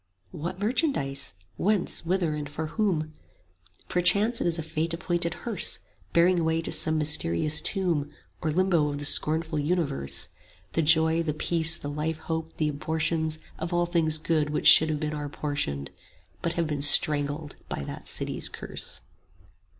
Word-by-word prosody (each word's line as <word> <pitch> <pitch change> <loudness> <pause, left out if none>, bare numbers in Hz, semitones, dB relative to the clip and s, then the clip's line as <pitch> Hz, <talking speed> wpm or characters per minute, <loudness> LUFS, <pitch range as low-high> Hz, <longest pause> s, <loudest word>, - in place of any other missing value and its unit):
What 175 +2 -5
merchandise? 200 - -1 0.2
whence, 205 -1 +1
whither, 170 -2 0
and 150 -1 -5
for 155 +2 -4
whom? 155 -4 -1 0.7
15 - - -28
Perchance 200 +6 +2
it - - +1
is 170 0 +1
a 165 - -3
Fate 160 +1 -2
appointed 170 0 -1
hearse, 225 -7 +2 0.3
Bearing 175 +1 +4
away 160 0 +1
to - - -3
some 160 0 +4
mysterious 150 - +2
tomb 170 -7 +1 0.3
Or 160 - -1
Limbo 170 -2 +2
of 145 - -4
the 145 - -4
scornful 155 +1 +1
universe 145 - -1 0.4
The 165 - +1
joy, 160 +1 +3
the 155 -3 -2
peace, 165 +1 +1
the - - -7
life 150 +2 -2
hope, 160 0 -5
the 155 -1 +1
abortions 155 +1 -1 0.2
Of 170 +2 -3
all 175 0 +2
things 165 -3 +1
good 155 -2 0
which 150 - -2
should 160 - +8
have 150 -1 -1
been 150 0 -3
our 145 -1 -4
portions, 140 - -3
20 - - -26 0.5
But 170 - -1
have 170 - 0
been 150 -2 -3
strangled 145 +1 +4
by - - -4
that - - -8
City's - - -2
curse. - - -7
160 Hz, 165 wpm, -27 LUFS, 150-170 Hz, 0.7 s, should